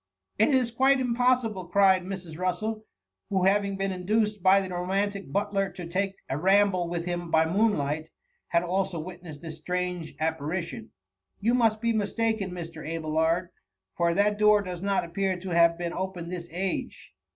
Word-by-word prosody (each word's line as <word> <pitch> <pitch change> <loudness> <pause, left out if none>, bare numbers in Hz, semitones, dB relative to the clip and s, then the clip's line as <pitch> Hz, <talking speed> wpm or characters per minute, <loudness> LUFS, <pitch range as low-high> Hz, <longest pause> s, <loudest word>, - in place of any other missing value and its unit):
"* 95 - -48
^ - - +6
It - - +4
is 250 -2 +1
quite 265 +3 +4
impossible,"' 245 -6 +1
cried 190 0 +4
Mrs. 180 -4 -6
Russel, 215 +5 -2 0.4
who 190 -2 +1
having 200 +1 +2
been 195 0 -1
induced 210 +3 0
by 190 +2 +6
the 190 -2 -4
romantic 195 +3 -2
butler 200 -1 0
to 180 -1 -7
take 195 +3 -1
a 135 - -2
ramble 190 -1 +3
with 170 -1 -3
him 175 -1 -3
by 160 0 +4
moon 205 +6 +2
light, 150 +2 -2 0.4
had 170 0 +2
also 185 0 -1
witnessed 170 -3 -9
this 160 -1 -7
strange 180 -2 -3
appari* 160 +2 -2
tton; 115 - -7
^* - - -25 0.5
you 230 +4 +2
must 225 -3 +2
bis 230 -1 +1
mistaken 220 -1 0
Mr. 165 -3 -7
Abelard, 160 +2 0 0.5
for 170 0 +1
that 205 +1 +2
door 210 -1 +5
does 180 -2 -6
not 200 0 +1
appear 185 +2 -1
to 190 +1 -7
have 170 0 +4
been 170 0 -3
opened 180 -2 -4
iliis 175 -2 -5
age. 180 +2 -4
185 Hz, 180 wpm, -27 LUFS, 170-205 Hz, 0.5 s, ^